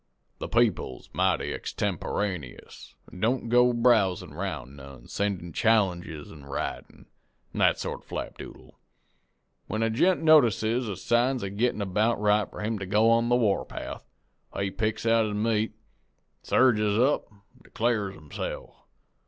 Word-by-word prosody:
The - - -5
people's 115 - 0
mighty 95 -1 +1
extemporaneous, 90 -11 -4 0.2
an' 90 - -11
don't 115 +3 0
go 125 +1 +5
browsin' 115 -6 +2
'round 65 +2 -5
none 70 -3 -12
sendin' 95 -5 -3
challenges 90 -9 0
in 75 -3 -12
writin', 70 0 -6 0.5
an' - - -5
that - - +4
sort - - -5
of - - -30
flapdoodle. - - -8 1.0
When 110 +2 -1
a 115 - +1
gent 175 +9 +2
notices 120 - +4
the 100 - -3
signs 120 +1 +1
a 100 - -4
gettin' 105 0 0
about 105 +4 +1
right 105 -1 +2
for - - -9
him 110 0 -2
to 95 - -5
go 105 +4 +4
on 115 +1 +3
the 120 - +4
war 110 -5 +2
path, - - -7 0.6
he 100 -1 -1
picks 110 +1 -2
out 115 -1 +4
his 105 - -3
meat, 110 0 0 0.7
surges 105 -5 +3
up, 130 +2 +1
an' 100 -1 -23 0.2
declares 110 -4 -1
himse'f. 75 -4 -6
105 Hz, 145 wpm, -27 LUFS, 95-115 Hz, 1.0 s, go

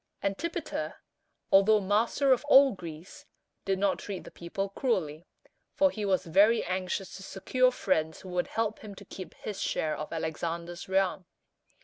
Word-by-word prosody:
Antipater, 200 +13 -3 0.6
although 205 +2 +6
master 220 +7 +3
of 255 - -1
all 275 -1 +7
Greece, 170 -3 -10 0.4
did 195 -1 +1
not 200 0 +1
treat 195 -3 -6
the - - -11
people 195 +3 -4
cruelly, 180 - -2 0.5
for 285 -1 +4
he 210 -2 -4
was 190 -2 +1
very 200 +7 +4
anxious 185 +1 -3
to - - -11
secure 250 +7 +1
friends 160 -9 -1
who 190 - -10
would 180 0 -1
help 225 -1 -2
him 210 -2 -10
to 200 - -12
keep 185 0 -9
his 210 -2 -6
share 155 -1 -1
of 155 - -6
Alexander's 170 +2 -4
realm. 190 -1 +1
195 Hz, 155 wpm, -29 LUFS, 175-215 Hz, 0.6 s, all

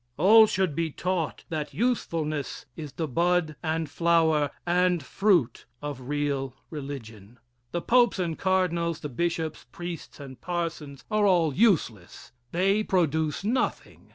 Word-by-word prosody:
All 215 +7 +7
should 185 -6 0
be 165 +2 -1
taught 175 +1 -2
that 150 -2 -4
usefulness 160 - -1
is 150 -3 -7
the 160 +1 -3
bud 170 +2 +1
and 160 -1 -1
flower 160 -2 +2 0.2
and 180 -2 +2
fruit 175 - +1
of 145 -3 -6
real 140 -3 -1 0.2
religion. 125 -7 -8 0.3
The 175 - -3
popes 240 -2 +4
and 170 -3 -1
cardinals, 170 -3 0
the 150 - -5
bishops, 165 +3 -2
priests 175 -3 -7
and 130 -4 -10
parsons 165 -5 -4
are 210 -1 +3
all 170 -6 +3
useless. 135 - 0 0.2
They 195 +4 +2
produce 160 -5 0
nothing. 240 +5 -2
165 Hz, 130 wpm, -27 LUFS, 145-180 Hz, 0.3 s, All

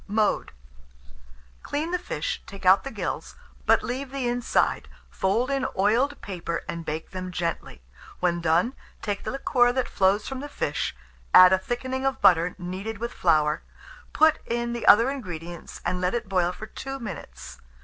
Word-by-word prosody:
Mode. 210 - +1 1.1
Clean 310 +4 -3
the 360 - 0
fish, - - -3
take 195 -1 -10
out 190 +1 +6
the 275 - -4
gills, - - -4 0.3
but - - +5
leave 260 +2 -4
the 270 -2 -2
inside, 245 0 +1 0.2
fold 225 +7 0
in 270 -1 0
oiled 235 +9 +2
paper, 175 -3 -4
and 170 0 -4
bake 160 0 -5
them 185 -1 -5
gently. 170 - -4 0.4
When 175 -1 +1
done, 170 +9 +2 0.3
take 205 -2 -2
the - - -3
liquor 245 -2 +2
that 255 0 -1
flows 195 +2 +2
from 265 -1 -4
the 290 +2 -6
fish, 145 - -2 0.4
add 185 0 +10
a 190 - +4
thickening 255 +5 -3
of 270 -1 0
butter 175 0 +4
kneaded 190 +4 -5
with 235 +3 -4
flour; 155 -3 +2 0.5
put 315 0 +4
in 235 0 -1
the 235 - -4
other 230 +5 +7
ingredients, 175 - -7
and 180 - -1
let 180 +5 +1
it 235 -3 -3
boil 180 -2 +1
for 215 - -8
2 270 +4 -6
minutes. 215 -9 -8
210 Hz, 170 wpm, -26 LUFS, 180-255 Hz, 1.1 s, add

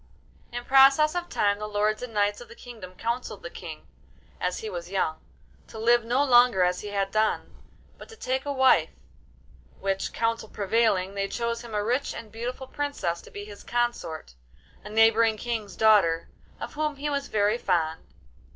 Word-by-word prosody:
In 240 0 -5
process 275 +3 +6
of 350 0 -3
time 205 0 +1
the 210 - -4
lords 210 +1 0
and 250 -1 -6
knights 205 0 0
of 240 - -10
the 235 - -13
kingdom 220 -8 -11
counselled 235 +5 -4
the - - -7
King - - -9 0.5
(as - - -1
he 445 - -5
was - - -6
young) - - -1 0.5
to - - -11
live 235 +1 +4
no 245 +5 +2
longer 245 -7 +5
as 180 0 +1
he 210 - -7
had 200 -1 -1
done, 215 +1 0 0.4
but - - -12
to 450 - -11
take 260 -8 -2
a 285 - -3
wife; 265 -2 +4 0.9
which 195 0 -1
counsel 230 -1 -1
prevailing, 200 -2 +1
they 200 0 -1
chose 235 +2 -2
him 235 -3 -8
a 205 - 0
rich 250 +6 -1
and 220 -2 -9
beautiful 245 +4 -5
princess 280 -13 -3
to - - -14
be 205 0 -8
his 205 -1 -11
consort—a 155 - -5
neighbouring 225 0 +4
King's 220 -3 -4
daughter, 195 -7 +4 0.3
of - - -6
whom 300 0 -1
he 285 +2 -4
was 280 0 -2
very 210 +2 +1
fond. 165 -5 0
225 Hz, 180 wpm, -26 LUFS, 205-250 Hz, 0.9 s, process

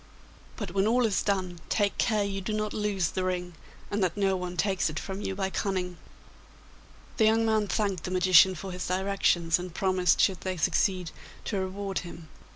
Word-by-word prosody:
But 205 -6 -5
when 195 +2 +1
all 245 +2 +3
is 210 -3 +1
done, 185 -4 -1
take 205 -2 +1
care 215 -3 +2
you 195 -1 -3
do 205 +3 -3
not 215 0 -2
lose 205 -5 0
the 185 - -2
ring, 180 -1 -2 0.4
and 205 -1 0
that 180 +1 -1
no 195 -1 +2
one 180 -1 -5
takes 190 -2 +1
it 155 - -6
from 190 +5 -5
you 195 - -3
by 190 0 -2
cunning.' 185 -3 -2 1.2
The 220 - +4
young 225 +1 +3
man 215 -2 +2
thanked 195 -4 -1
the - - -3
magician 185 0 +5
for 190 +3 -7
his 180 0 -5
directions, 180 -3 +1
and 180 -1 -7
promised, 185 -3 +2
should 190 -3 +2
they 185 -1 -3
succeed, 180 0 +1 0.3
to 200 - -1
reward 195 +1 -3
him. 170 -2 -10
190 Hz, 190 wpm, -28 LUFS, 180-205 Hz, 1.2 s, magician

